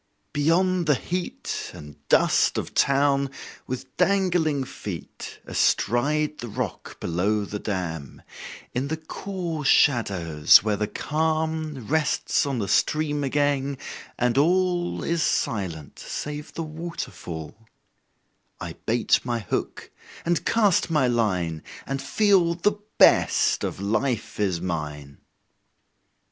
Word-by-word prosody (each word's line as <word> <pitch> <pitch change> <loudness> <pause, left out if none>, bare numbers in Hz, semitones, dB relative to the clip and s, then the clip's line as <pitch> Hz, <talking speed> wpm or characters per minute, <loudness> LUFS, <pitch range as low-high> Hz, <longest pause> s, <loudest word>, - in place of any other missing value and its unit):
Beyond 175 +4 +2
the 150 - +5
heat 180 +6 -4
And 75 -1 -11
dust - - +3
of - - -4
town, 140 0 +3 0.4
with 130 -1 -6
dangling 175 -7 +2
feet 95 - -8
Astride 150 +5 +1
the 120 - -5
rock 105 - -5
below 100 +5 0
the 105 +1 -5
dam, 85 -9 -4 0.5
In 130 +3 -1
the 160 +2 -2
cool 170 -1 -5
shadows 95 - +4
where 105 -1 +1
the 105 +1 -1
calm 155 -3 -2
Rests 155 +1 +1
on 135 -2 -1
the 100 -4 -2
stream 150 +2 +1
again, 140 0 0 0.4
and 125 +2 +2
all 175 +2 +1
Is 170 -1 0
silent 85 - -2
save 150 +1 -5
the 165 - -3
waterfall, 150 - -6 1.0
I - - -6
bait 115 +1 +3
my 120 -1 -1
hook 100 -5 -4 0.3
and 170 0 0
cast 205 -6 +3
my 150 -6 +3
line, 90 -10 0 0.2
And 135 0 -3
feel 195 -5 +3
the 205 +4 0 0.2
best - - +5
of - - -3
life 110 +2 -1
is 95 -4 +1
mine. 75 -5 -5
140 Hz, 115 wpm, -25 LUFS, 100-160 Hz, 1.0 s, the